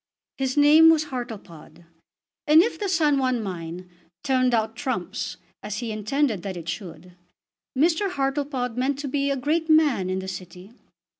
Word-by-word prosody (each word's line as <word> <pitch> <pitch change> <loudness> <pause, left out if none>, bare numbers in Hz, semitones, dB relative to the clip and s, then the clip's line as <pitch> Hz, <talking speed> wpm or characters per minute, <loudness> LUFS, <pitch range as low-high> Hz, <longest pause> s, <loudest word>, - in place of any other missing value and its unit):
His 265 +1 -1
name 305 +3 +7
was 310 -2 +2
Hartlepod; 190 -10 -8 0.6
and 310 +3 +7
if 465 - -3
the 405 -2 -2
San 305 -5 +2
Juan 255 -2 +1
mine 180 -3 -6 0.4
"turned 255 -2 +2
out 225 -1 0
trumps," 255 +2 -4 0.2
as 210 0 -5
he 235 -1 -4
intended 215 0 -1
that 190 0 -5
it 170 -1 -9
should, 175 -1 -7 0.6
Mr. 335 +7 +2
Hartlepod 270 -5 -2
meant 265 +2 0
to 285 0 -5
be 280 +1 -1
a 275 - 0
great 315 +5 -1
man 295 -12 +3
in 185 - -1
the 190 0 -5
City. 185 +2 -9
255 Hz, 160 wpm, -24 LUFS, 195-290 Hz, 0.6 s, name